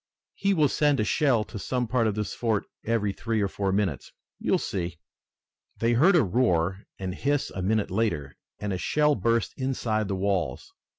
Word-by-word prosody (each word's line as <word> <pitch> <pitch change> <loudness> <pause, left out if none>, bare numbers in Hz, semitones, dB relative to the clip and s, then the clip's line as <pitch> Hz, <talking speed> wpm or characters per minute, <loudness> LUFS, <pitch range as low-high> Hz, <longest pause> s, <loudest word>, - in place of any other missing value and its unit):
He 200 0 +1
will 155 -3 +4
send 145 0 +2
a - - +3
shell 130 -2 +2
to 105 -1 -8
some 125 +3 -1
part 115 -1 +2
of 105 - -1
this 105 -1 -3
fort 110 -4 0 0.2
every 110 -3 0
three 115 +2 -2
or 100 - +2
four 95 0 -2
minutes. 95 -8 -1 0.3
You - - 0
will - - +5
see." 85 -3 -3 0.8
They 115 +1 +2
heard 165 +11 +5
a 170 - +5
roar 95 -4 +1
and 95 -1 -4
hiss 145 +7 0
a 95 - -5
minute 105 +1 0
later, 95 -10 -1 0.2
and 105 -1 -3
a 90 - -3
shell 150 +9 +2
burst 115 -1 +1
inside 115 -5 -1
the 100 - -1
walls. 95 -8 -1
110 Hz, 190 wpm, -27 LUFS, 95-125 Hz, 0.8 s, will